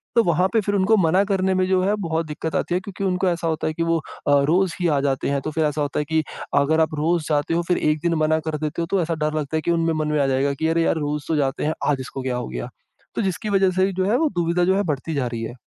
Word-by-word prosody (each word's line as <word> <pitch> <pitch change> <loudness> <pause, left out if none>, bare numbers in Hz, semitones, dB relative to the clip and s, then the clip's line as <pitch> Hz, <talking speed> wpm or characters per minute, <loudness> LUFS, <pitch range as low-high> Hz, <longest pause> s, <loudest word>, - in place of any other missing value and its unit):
तो 230 - +6
वहाँ 175 +1 +2
पे 225 - +4
फिर 205 0 -1
उनको 200 +3 +3
मना 180 +5 +3
करने 190 -1 +1
में 185 0 +2
जो 185 -1 +2
है, 200 +2 +2
बहुत 165 -2 -1
दिक्कत 155 +1 -5
आती 175 - -1
है, 180 - +2
क्योंकि 195 +1 -7
उनको 185 0 +1
ऐसा 170 -1 -2
होता 160 -1 -1
है 155 - -1
कि 165 - -2
वो 165 0 +1 0.3
अ, 145 0 +5
रोज़ 180 +3 +2
ही 175 - +2
आ 145 -3 +2
जाते 135 -1 0
हैं। 140 -1 0
तो 155 - -4
फिर 160 0 0
ऐसा 150 0 -1
होता 145 0 -1
है 150 - -1
कि 160 +1 +1 0.4
अगर 160 +3 +2
आप 155 - +1
रोज़ 160 +2 +1
जाते 150 +2 +1
हो, 170 - +2
फिर 180 - +2
एक 150 0 +1
दिन 170 - +2
मना 155 +1 +2
कर 155 - -2
देते 155 +2 -3
हो, - - 0
तो 195 -2 +2
ऐसा 165 0 -1
डर 155 - -1
लगता 150 +2 -2
है - - -1
कि 170 - 0
उनमें 165 -1 +1
मन 155 -1 -1
में 150 - +1
आ 135 - +2
जाएगा 135 +1 +1
कि, 160 +3 -1
"अरे! 165 0 +2
यार, - - +2
रोज़ 150 -1 -3
तो 160 - 0
जाते 140 0 0
हैं, 155 - +1 0.2
आज 140 - 0
इसको 130 +1 -6
क्या 130 -1 -2
हो - - -4
गया?" - - -5 0.5
तो - - 0
जिसकी 195 +2 -2
वज़ह 195 -2 +3
से 185 0 +3
ही 195 - -2
जो 185 +1 0
है, 225 +5 +2
वो 320 -1 +2
दुविधा 170 +1 +1
जो 190 - +3
है, 200 - +1
बढ़ती 155 -1 -3
जा 130 -3 0
रही 115 -1 -5
है। 115 - -5
160 Hz, 320 wpm, -22 LUFS, 150-185 Hz, 0.5 s, तो